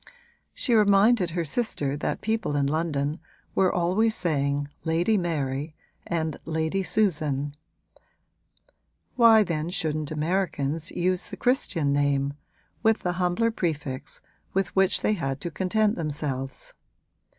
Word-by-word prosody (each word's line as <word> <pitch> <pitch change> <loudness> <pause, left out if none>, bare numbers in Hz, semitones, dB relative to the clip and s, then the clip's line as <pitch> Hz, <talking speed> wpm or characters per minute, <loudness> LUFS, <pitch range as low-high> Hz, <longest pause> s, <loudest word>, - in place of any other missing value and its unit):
She 245 - 0
reminded 205 -2 +5
her 170 0 -2
sister 145 - -1
that 145 - -3
people 220 -8 -1
in 140 -1 +2
London 150 0 -1 0.3
were 190 -1 +3
always 190 +6 +2
saying 145 -4 0 0.2
Lady 170 +7 +2
Mary 155 -4 -2 0.3
and 160 -3 -1
Lady 160 +4 -1
Susan: 150 -9 0 1.6
why 230 -3 +7
then 165 -3 -2
shouldn't 155 -4 -2
Americans 155 -2 -1
use 180 +1 0
the - - -8
Christian 190 - +1
name, 140 -1 +1 0.5
with 225 0 +3
the 180 - +1
humbler 180 +6 +2
prefix 150 -10 -3 0.3
with 195 0 0
which 190 -1 +3
they 215 - +3
had 135 -8 -2
to 170 - -4
content 205 +5 +1
themselves? 140 -4 -4
165 Hz, 120 wpm, -26 LUFS, 145-195 Hz, 1.6 s, why